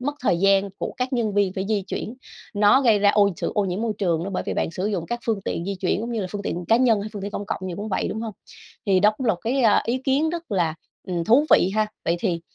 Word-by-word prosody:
mất 290 +3 -2
thời 180 -9 +1
gian 195 0 +3
của - - -3
các 255 +1 -2
nhân 225 -5 0
viên 200 -2 +2
phải 190 0 -3
di 210 -2 +1
chuyển. 195 +4 -5 0.4
Nó 205 +5 +5
gây 225 -6 +4
ra 200 0 +4
ô 205 -1 +4
sự - - -3
ô 205 - +2
nhiễm 185 +1 -2
môi 230 -1 0
trường 170 -5 0
nữa 200 - -4
bởi - - -1
vì - - -2
bạn - - -1
sử 185 +4 -3
dụng 185 -6 -2
các 240 +4 -3
phương 220 -3 0
tiện 170 - -3
di 200 +1 -3
chuyển 185 +2 -1
cũng 235 +2 -4
như 225 - -1
là 190 - -2
phương 205 +1 -5
tiện 175 -2 -3
cá 225 - +6
nhân 235 -4 +3
hay 205 - -5
phương 205 -2 -6
tiện 200 - -4
công 205 0 -5
cộng 210 - -3
gì 180 - -4
cũng 210 +3 -5
vậy, 195 - -1
đúng 220 - -4
hông? 225 -2 -5 0.5
Thì 190 -2 +3
đó 210 +2 +5
cũng 260 - -3
là 220 - +4
một 175 - -14
cái, 255 +3 +1
a, 215 -3 +4
ý 245 +3 0
kiến 275 +4 +1
rất 340 -3 -6
là, 170 -6 +1 0.3
ừm, 175 -2 -1
thú 250 - +5
vị 185 - +5
ha. 215 0 +2 0.2
Vậy 170 - +1
thì, 175 -5 -1
205 Hz, 305 wpm, -23 LUFS, 190-230 Hz, 0.5 s, cá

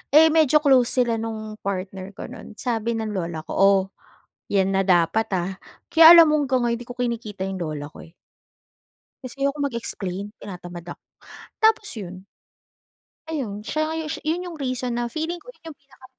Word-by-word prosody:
eh, 320 +1 +8
medyo 305 -1 +4
close 260 -4 +5 0.2
sila 230 -1 -1
nung 220 -1 -6
partner 190 0 -5
ko - - -8
noon. - - -11
Sabi 230 -1 -2
ng 220 -1 -3
lola 170 -5 -4
ko, - - -10
"Oh, 195 0 +5 0.7
'yan 195 -1 +2
na 195 - +2
dapat 180 +5 +3
ah." 180 +2 -2 0.4
Kaya 325 +1 +10
alam 330 -2 +8
mo 305 - +3
hanggang 260 -3 +1
ngayon 235 -1 +1
hindi 240 - -11
ko 245 - -7
kinikita 230 -5 -3
'yong 190 -1 -5
lola 155 -4 -4
ko - - -12
eh. 165 - -23 1.1
Kasi 255 +2 -6
ayoko 280 +1 0
mag-explain, 210 -7 -4
tinatamad 175 -3 -9
ako. - - -49 0.6
Tapos 440 -1 +3
'yun, 185 -3 -8 1.0
ayun, 235 -10 -4
siya 305 +8 -2
nga 320 - -3
'yun 315 -1 -4 0.2
'yun 335 +3 -1
'yung 335 - -9
reason 255 -3 -3
na 240 - -1
feeling 320 +7 -3
ko - - -15
'yun - - -32
'yung 300 - -12
pinaka 270 -1 -20
230 Hz, 180 wpm, -23 LUFS, 195-285 Hz, 1.1 s, Kaya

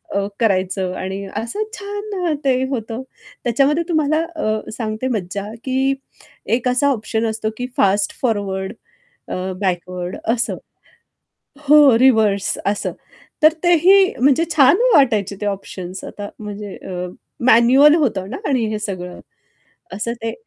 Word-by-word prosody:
अ, 200 - +1
करायचं 190 -3 0
आणि 190 +1 -4
असं 235 - -2
छान 400 -4 -3
ते 255 -1 +2
होतं. 230 -2 -4 0.4
त्याच्यामध्ये 275 +7 +2
तुम्हाला 310 -1 +2 0.2
अ, 215 -8 -2
सांगते 220 +2 -3
मज्जा 200 -3 -3 0.2
की 265 +1 +1 0.6
एक 250 +1 -2
असा 255 +3 +2
ऑप्शन 220 -2 -2
असतो 220 0 -2
की 250 0 -3
फास्ट 200 +1 +2
फॉरवर्ड 200 -4 -1 0.6
अ, - - -2 0.3
बॅकवर्ड 180 -1 -3 0.2
असं. 240 -1 -1 1.1
हो 290 -5 +7
रिव्हर्स 220 -6 +3
असं. 200 +1 -1 0.5
तर 310 - +7
तेही 370 +3 +5
म्हणजे 280 +4 +4
छान 280 +4 +6 0.2
वाटायचे 215 -8 +3
ते 210 - -2
ऑप्शन्स. 190 -2 -5
आता 205 0 -7
म्हणजे 205 -2 -7
अ, 180 -1 -6 0.4
मॅन्युअल 255 +6 +6
होतं 200 - -1
ना 260 - -4
आणि 255 -5 +1
हे 215 - -2
सगळं. 185 -4 -6 0.7
असं 230 +4 -3
ते 225 - -2
225 Hz, 130 wpm, -19 LUFS, 200-275 Hz, 1.1 s, हो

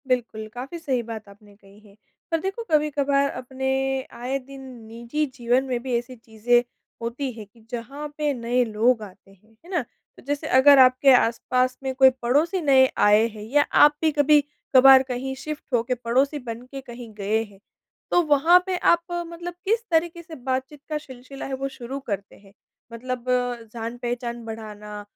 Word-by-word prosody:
बिल्कुल, 235 -4 -2
काफ़ी 265 +7 -7
सही 270 -6 -1
बात 220 -2 -8
आपने 205 0 -18
कही 200 0 -20
है। 205 -2 -20 0.4
पर 330 - +1
देखो, 390 +6 -4
कभी-कभार 285 -2 +2
अपने 265 +1 -4 0.5
आए 255 +3 -2
दिन 270 +1 -12 0.3
निजी 235 +7 -3
जीवन 245 +1 +1
में 250 -2 -2
भी 255 -2 0
ऐसी 250 +2 -6
चीज़ें 230 +1 +1 0.4
होती 250 +4 -3
हैं, 225 -3 -10
कि 230 - -21
जहाँ 275 +5 -6
पे 300 -1 0
नए 245 0 0
लोग 225 +2 +1
आते 195 -1 -14
हैं, 200 +3 -25
है - - -15
ना? 355 -4 0 0.4
तो - - -15
जैसे 290 0 -2
अगर 280 +1 +7
आपके 255 +1 +6
आस-पास 250 +2 +1
में 265 -1 -2
कोई 265 0 +7
पड़ोसी 300 +10 +1
नए 270 -4 +5
आए 210 +2 +5
हैं, 215 -2 -10
या 275 +7 +2
आप 295 +1 +5
भी 320 -1 +3
कभी-कभार 285 -3 +5
कहीं 260 +1 -4
शिफ्ट 305 0 -5
हो 235 -2 +3
के 250 +2 -1
पड़ोसी 260 +5 0
बन 235 -2 -7
के 275 -1 -6
कहीं 240 -3 -11
गए 210 +2 -1
हैं। 205 -3 -16 0.5
तो 350 - +5
वहाँ 320 +3 +5
पे 375 -1 -1
आप 340 -1 +3 0.2
मतलब 345 +1 -7
किस 450 +4 +1
तरीके 335 +1 +1
से 325 -1 -11
बातचीत 265 +2 -4
का 305 - -1
सिलसिला 265 -1 -10
है 270 - -5
वो 270 +1 -3
शुरू 260 +3 -6
करते 200 -1 -4
हैं? 195 -1 -20 0.4
मतलब 250 +1 -5 0.5
जान-पहचान 240 +1 -5
बढ़ाना, 210 -2 -8
255 Hz, 175 wpm, -24 LUFS, 230-285 Hz, 0.5 s, अगर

